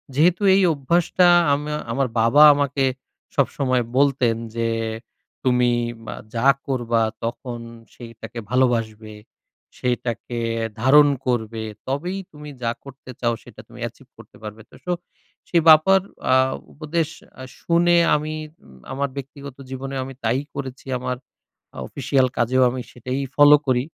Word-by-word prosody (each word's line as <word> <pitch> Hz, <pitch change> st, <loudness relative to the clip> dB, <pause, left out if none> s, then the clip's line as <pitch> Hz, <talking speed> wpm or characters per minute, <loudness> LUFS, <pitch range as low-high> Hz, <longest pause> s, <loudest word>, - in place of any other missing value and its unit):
যেহেতু 175 Hz, +6 st, +3 dB
এই 195 Hz, -, +4 dB
অভ্যাসটা 170 Hz, +5 st, +2 dB, 0.3 s
আমা 150 Hz, +1 st, -2 dB, 0.2 s
আমার 135 Hz, +1 st, 0 dB
বাবা 120 Hz, +7 st, +6 dB
আমাকে 140 Hz, -1 st, 0 dB, 0.5 s
সবসময় 130 Hz, -3 st, +1 dB
বলতেন 135 Hz, -4 st, +3 dB, 0.2 s
যে 115 Hz, 0 st, 0 dB, 0.7 s
"তুমি 125 Hz, -1 st, +3 dB, 0.3 s
মা -, -, -5 dB, 0.2 s
যা 115 Hz, +4 st, +1 dB, 0.2 s
করবা 120 Hz, -3 st, 0 dB, 0.2 s
তখন 120 Hz, +1 st, -4 dB, 0.3 s
সেইটাকে 115 Hz, -1 st, -9 dB
ভালোবাসবে, 115 Hz, -4 st, 0 dB, 0.6 s
সেইটাকে 120 Hz, -1 st, -3 dB, 0.4 s
ধারণ 145 Hz, +3 st, +6 dB, 0.2 s
করবে, 110 Hz, -2 st, -1 dB, 0.2 s
তবেই 175 Hz, +8 st, -2 dB
তুমি 150 Hz, -1 st, -10 dB
যা 115 Hz, -, +1 dB
করতে 135 Hz, -1 st, -12 dB
চাও 120 Hz, -1 st, +1 dB
সেইটা -, -, -13 dB
তুমি -, -, -14 dB
achieve -, -, -16 dB
করতে -, -, -16 dB
পারবে।" 105 Hz, +1 st, -8 dB
তো -, -, -17 dB
সো 180 Hz, -, -2 dB, 0.6 s
সেই 170 Hz, -2 st, +3 dB
বাবার 175 Hz, +5 st, +7 dB, 0.3 s
আ -, -, +6 dB, 0.4 s
উপদেশ 160 Hz, +1 st, -2 dB, 0.3 s
আ -, -, -7 dB, 0.2 s
শুনে 175 Hz, +1 st, +3 dB, 0.2 s
আমি 155 Hz, +1 st, -3 dB, 0.3 s
উম 65 Hz, -1 st, -17 dB, 0.2 s
আমার 140 Hz, +1 st, -1 dB
ব্যক্তিগত 140 Hz, 0 st, -8 dB
জীবনেও 135 Hz, +1 st, -5 dB
আমি 135 Hz, -, -8 dB
তাই 115 Hz, +4 st, +1 dB, 0.2 s
করেছি। 135 Hz, -2 st, -7 dB
আমার 125 Hz, 0 st, -3 dB, 0.6 s
আ -, -, -11 dB
অফিসিয়াল 135 Hz, -1 st, +1 dB
কাজেও 130 Hz, +2 st, +3 dB
আমি 125 Hz, 0 st, -4 dB
সেটাই 125 Hz, +2 st, -4 dB, 0.2 s
ফলো 145 Hz, 0 st, +8 dB
করি। 125 Hz, -1 st, +2 dB
130 Hz, 135 wpm, -22 LUFS, 120-145 Hz, 0.7 s, ফলো